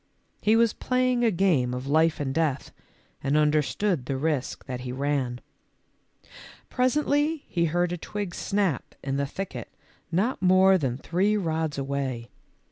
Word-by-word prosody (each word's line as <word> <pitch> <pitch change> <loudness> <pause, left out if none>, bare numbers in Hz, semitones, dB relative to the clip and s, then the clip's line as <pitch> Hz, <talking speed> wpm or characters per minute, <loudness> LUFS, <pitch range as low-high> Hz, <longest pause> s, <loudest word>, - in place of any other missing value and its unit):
He 215 +1 +4
was 230 -1 +4
playing 255 -1 +1
a 230 - +5
game 165 - +2
of 125 +1 -5
life 155 +3 +2
and 135 -2 -2
death 155 -4 -1 0.5
and 140 +2 +2
understood 150 +1 +1
the 135 - -1
risk 145 -2 -2
that 125 -2 -5
he 125 0 -5
ran. 130 -2 -1 1.3
Presently 290 +4 +1
he 170 -1 0
heard 175 +2 0
a 175 - -2
twig 200 +1 -5
snap 195 - -1
in 135 0 -2
the 140 0 0
thicket 195 +6 -6 0.4
not 195 +9 0
more 185 +1 +5
than 130 -5 -1
three 190 +9 +1
rods 160 -5 -1
away. 135 -4 -3
160 Hz, 145 wpm, -26 LUFS, 135-200 Hz, 1.3 s, a